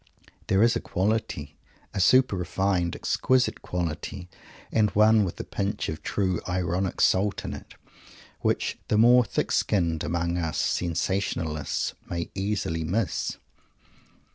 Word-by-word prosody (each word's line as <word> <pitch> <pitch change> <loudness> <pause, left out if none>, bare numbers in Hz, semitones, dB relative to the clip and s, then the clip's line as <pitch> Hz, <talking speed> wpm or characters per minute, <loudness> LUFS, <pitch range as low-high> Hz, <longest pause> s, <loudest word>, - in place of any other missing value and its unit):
There 95 +2 +4
is 115 -1 +4
a - - +1
quality, 95 -7 -2 0.4
a - - -2
super 130 +4 +5
refined, 90 -1 0
exquisite 130 -1 +1
quality, 90 +2 -4 0.4
and 110 -2 +3
one 110 +1 +6
with 90 - -4
a - - -2
pinch 100 +1 -3
of 80 0 -5
true 95 +1 -1
ironic 90 +1 -1
salt 100 +2 +2
in - - -4
it, - - -10 0.6
which - - -1
the 105 - +2
more 120 +3 +7
thick - - -2
skinned 85 -6 +1
among 85 +1 -1
us 80 -2 -2
sensationalists 85 -3 -1 0.2
may 85 -1 -3
easily 95 -5 -2
miss. 95 +6 -1
95 Hz, 130 wpm, -26 LUFS, 85-105 Hz, 0.6 s, more